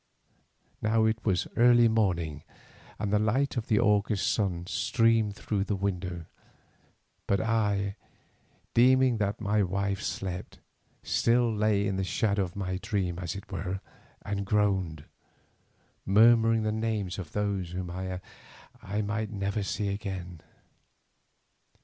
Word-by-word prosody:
Now 110 Hz, +1 st, +2 dB
it 110 Hz, 0 st, 0 dB
was 95 Hz, -3 st, +1 dB
early 120 Hz, 0 st, +6 dB
morning, 85 Hz, -9 st, 0 dB, 0.6 s
and 105 Hz, -1 st, -2 dB
the 105 Hz, -, +4 dB
light 125 Hz, +7 st, +1 dB
of 120 Hz, -3 st, -3 dB
the 105 Hz, -, +2 dB
August 105 Hz, 0 st, +2 dB
sun 90 Hz, -5 st, -1 dB
streamed 110 Hz, +3 st, +2 dB
through 100 Hz, -1 st, -2 dB
the 105 Hz, -, -1 dB
window, 90 Hz, -3 st, -3 dB, 1.0 s
but 100 Hz, -, +2 dB
I, 105 Hz, -2 st, 0 dB, 0.8 s
deeming 130 Hz, 0 st, +5 dB
that 100 Hz, -1 st, -1 dB
my 105 Hz, 0 st, +1 dB
wife 100 Hz, +1 st, -1 dB
slept, 95 Hz, -3 st, -4 dB, 0.5 s
still 120 Hz, -1 st, +2 dB
lay 105 Hz, -1 st, +2 dB
in 100 Hz, -1 st, -1 dB
the 95 Hz, -, 0 dB
shadow 100 Hz, +2 st, 0 dB
of 90 Hz, -2 st, -4 dB
my 95 Hz, -2 st, -2 dB
dream 95 Hz, -5 st, -2 dB
as 85 Hz, -1 st, -4 dB
it 100 Hz, -1 st, -9 dB
were, 95 Hz, 0 st, -3 dB, 0.4 s
and 100 Hz, 0 st, -2 dB
groaned, 95 Hz, -7 st, 0 dB, 1.0 s
murmuring 115 Hz, +2 st, +5 dB
the 110 Hz, -, 0 dB
names 110 Hz, -4 st, -2 dB
of 85 Hz, -5 st, -8 dB
those 100 Hz, -4 st, -1 dB
whom 90 Hz, 0 st, -5 dB
I 95 Hz, 0 st, -4 dB, 0.8 s
might 105 Hz, +1 st, -2 dB
never 100 Hz, 0 st, -2 dB
see 100 Hz, +1 st, -2 dB
again. 95 Hz, -4 st, -5 dB
100 Hz, 130 wpm, -28 LUFS, 95-110 Hz, 1.0 s, early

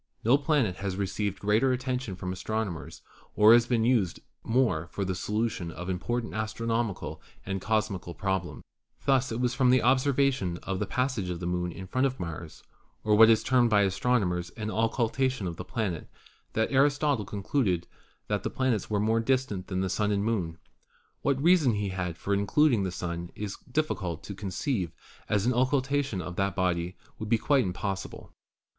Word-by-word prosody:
No 120 Hz, +4 st, +5 dB
planet 140 Hz, -, +1 dB
has 95 Hz, -1 st, -3 dB
received 100 Hz, 0 st, -2 dB
greater 110 Hz, +7 st, +2 dB
attention 125 Hz, -4 st, -2 dB
from 90 Hz, 0 st, -4 dB
astronomers 100 Hz, -2 st, -4 dB, 0.3 s
or 105 Hz, +2 st, +8 dB
has 120 Hz, 0 st, +5 dB
been 115 Hz, -3 st, +2 dB
used 115 Hz, -8 st, +2 dB, 0.2 s
more 115 Hz, -10 st, +1 dB
for 100 Hz, -, -3 dB
the 95 Hz, -, -1 dB
solution 105 Hz, -2 st, -2 dB
of 90 Hz, +3 st, -5 dB
important 115 Hz, +6 st, -2 dB
astronomical 110 Hz, 0 st, -2 dB, 0.2 s
and 95 Hz, -1 st, -3 dB
cosmical 105 Hz, -5 st, -1 dB
problems. 95 Hz, -3 st, -2 dB, 0.4 s
Thus 135 Hz, -2 st, +3 dB
it 115 Hz, -, -2 dB
was 125 Hz, -1 st, +1 dB
from 125 Hz, 0 st, +3 dB
an 130 Hz, -1 st, +5 dB
observation 130 Hz, -7 st, +2 dB
of 95 Hz, -1 st, -3 dB
the 105 Hz, -, -1 dB
passage 125 Hz, -7 st, -1 dB
of 85 Hz, -1 st, -3 dB
the 85 Hz, -, -5 dB
Moon 90 Hz, 0 st, -1 dB
in 95 Hz, +3 st, -8 dB
front 130 Hz, +8 st, +1 dB
of 130 Hz, -1 st, -6 dB
Mars, 85 Hz, -1 st, -7 dB, 0.4 s
or 105 Hz, -, +2 dB
what 110 Hz, +2 st, +8 dB
is 110 Hz, -1 st, +4 dB
termed 125 Hz, -2 st, +3 dB
by 105 Hz, -2 st, +4 dB
astronomers 95 Hz, -3 st, +1 dB
an 110 Hz, -1 st, -3 dB
occultation 115 Hz, +1 st, 0 dB
of 85 Hz, -2 st, -4 dB
the -, -, -5 dB
planet, 95 Hz, -5 st, -3 dB, 0.4 s
that 110 Hz, -, 0 dB
Aristotle 140 Hz, -2 st, +3 dB
concluded 100 Hz, -3 st, -1 dB, 0.4 s
that -, -, 0 dB
the -, -, -2 dB
planets 130 Hz, -7 st, 0 dB
are 105 Hz, -1 st, +1 dB
more 110 Hz, +2 st, +2 dB
distant 115 Hz, -6 st, 0 dB
than 95 Hz, -1 st, -1 dB
the 95 Hz, -, 0 dB
Sun 105 Hz, +2 st, 0 dB
and 100 Hz, 0 st, 0 dB
Moon. 90 Hz, -8 st, -1 dB, 0.6 s
What 140 Hz, -2 st, +1 dB
reason 160 Hz, -5 st, +4 dB
he 105 Hz, -1 st, -1 dB
had 95 Hz, -3 st, -3 dB
for 100 Hz, +4 st, -2 dB
including 110 Hz, +5 st, +3 dB
the 95 Hz, -1 st, -1 dB
Sun 85 Hz, -1 st, -4 dB
it -, -, -10 dB
is 100 Hz, -2 st, -4 dB
difficult 95 Hz, -, -1 dB
to 100 Hz, -, -6 dB
conceive, 95 Hz, -, -2 dB, 0.4 s
as 105 Hz, -1 st, +1 dB
an 125 Hz, -, +3 dB
occultation 135 Hz, -1 st, +1 dB
by 90 Hz, 0 st, -4 dB
that 95 Hz, +1 st, -1 dB
body 90 Hz, 0 st, -1 dB, 0.2 s
would 110 Hz, -1 st, -5 dB
be 115 Hz, -, +4 dB
quite 135 Hz, +3 st, +3 dB
impossible. 95 Hz, +1 st, -4 dB
105 Hz, 180 wpm, -28 LUFS, 95-125 Hz, 0.6 s, or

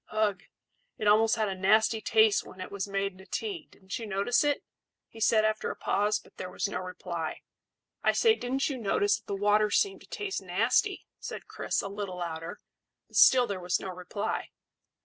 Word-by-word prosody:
Ugh! 215 Hz, -2 st, 0 dB, 0.6 s
It 215 Hz, -, -2 dB
almost 220 Hz, +2 st, +5 dB
had 220 Hz, -2 st, 0 dB
a 195 Hz, -, -2 dB
nasty 215 Hz, +4 st, +3 dB
taste 220 Hz, -2 st, +4 dB
when 185 Hz, -, -13 dB
it 185 Hz, -, -6 dB
was 200 Hz, 0 st, -3 dB
made 195 Hz, 0 st, -1 dB
into 190 Hz, 0 st, -16 dB
tea. 390 Hz, -8 st, -4 dB
Didn't 190 Hz, +2 st, -7 dB
you 225 Hz, -, -6 dB
notice 200 Hz, +7 st, +2 dB
it?" 290 Hz, -1 st, 0 dB, 0.4 s
he 225 Hz, -, -14 dB
said, 220 Hz, -1 st, +4 dB
after 215 Hz, 0 st, 0 dB
a -, -, -4 dB
pause; 210 Hz, +1 st, +1 dB
but -, -, -17 dB
there 185 Hz, -, -5 dB
was 205 Hz, -, -2 dB
no 200 Hz, -, -3 dB
reply. 180 Hz, -3 st, -5 dB, 0.6 s
"I -, -, +4 dB
say, 450 Hz, -2 st, +5 dB
didn't 265 Hz, -, -1 dB
you 270 Hz, -4 st, -3 dB
notice 205 Hz, -1 st, +2 dB
that 225 Hz, -, -31 dB
the 200 Hz, -, -2 dB
water 210 Hz, +1 st, +3 dB
seemed 390 Hz, -, +1 dB
to -, -, -16 dB
taste 405 Hz, -2 st, -4 dB
nasty?" -, -, +1 dB
said -, -, -7 dB
Chris, -, -, -2 dB
a -, -, -3 dB
little 200 Hz, -2 st, -5 dB
louder; 165 Hz, -1 st, -5 dB, 0.5 s
but -, -, -16 dB
still 255 Hz, -1 st, +7 dB
there 200 Hz, -4 st, -4 dB
was 180 Hz, 0 st, 0 dB
no 190 Hz, -, -6 dB
reply. 185 Hz, +4 st, -4 dB
205 Hz, 200 wpm, -29 LUFS, 190-225 Hz, 0.6 s, still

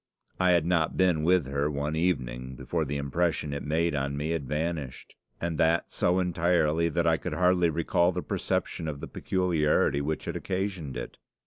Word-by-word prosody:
I 90 Hz, -1 st, +4 dB
had 85 Hz, -2 st, +3 dB
not 85 Hz, -2 st, +1 dB
been 90 Hz, -4 st, +3 dB
with 90 Hz, -1 st, +3 dB
her 70 Hz, +2 st, -1 dB
one 75 Hz, +1 st, -2 dB
evening 65 Hz, -7 st, -1 dB
before 75 Hz, +6 st, -2 dB
the 70 Hz, +1 st, -3 dB
impression 75 Hz, +2 st, -1 dB
it 70 Hz, -, -3 dB
made 80 Hz, +3 st, 0 dB
on 70 Hz, 0 st, -2 dB
me 75 Hz, +3 st, -2 dB
had 80 Hz, -5 st, -2 dB
vanished, 75 Hz, -2 st, -4 dB, 0.2 s
and 85 Hz, -2 st, -3 dB
that 80 Hz, +1 st, +2 dB
so 90 Hz, +1 st, +2 dB
entirely 85 Hz, -2 st, +2 dB
that 85 Hz, +1 st, 0 dB
I 80 Hz, -1 st, +4 dB
could -, -, -5 dB
hardly 90 Hz, -1 st, +3 dB
recall 85 Hz, +2 st, +2 dB
the 90 Hz, 0 st, -4 dB
perception 80 Hz, -, -2 dB
of 75 Hz, -2 st, -4 dB
the -, -, -6 dB
peculiarity 80 Hz, -6 st, +1 dB
which 75 Hz, +2 st, -3 dB
had -, -, -4 dB
occasioned 95 Hz, -8 st, -3 dB
it. -, -, -7 dB
80 Hz, 185 wpm, -28 LUFS, 70-85 Hz, 0.2 s, I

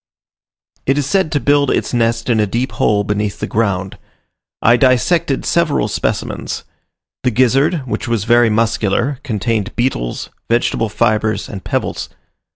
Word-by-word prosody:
It 135 Hz, +2 st, +2 dB
is 145 Hz, -, +1 dB
said 190 Hz, +2 st, +1 dB
to 145 Hz, -, +1 dB
build 145 Hz, -1 st, +2 dB
its -, -, 0 dB
nest 115 Hz, -1 st, +1 dB
in 115 Hz, -3 st, +2 dB
a 105 Hz, -, +2 dB
deep 120 Hz, +6 st, -2 dB
hole 105 Hz, -1 st, +1 dB
beneath 105 Hz, 0 st, -2 dB
the -, -, -2 dB
ground. 100 Hz, -4 st, -1 dB, 0.6 s
I 115 Hz, -, +5 dB
dissected 130 Hz, +4 st, +2 dB
several 170 Hz, -3 st, +1 dB
specimens: -, -, -3 dB, 0.6 s
the -, -, +2 dB
gizzard, 135 Hz, +7 st, +2 dB
which 130 Hz, -, -3 dB
was 115 Hz, -4 st, 0 dB
very 120 Hz, +1 st, +4 dB
muscular, 115 Hz, +4 st, 0 dB
contained 110 Hz, -3 st, -2 dB
beetles, 120 Hz, -, -2 dB, 0.2 s
vegetable 115 Hz, -1 st, +1 dB
fibres, 110 Hz, +1 st, 0 dB
and 95 Hz, -3 st, -8 dB
pebbles. -, -, -2 dB
120 Hz, 145 wpm, -17 LUFS, 105-135 Hz, 0.6 s, I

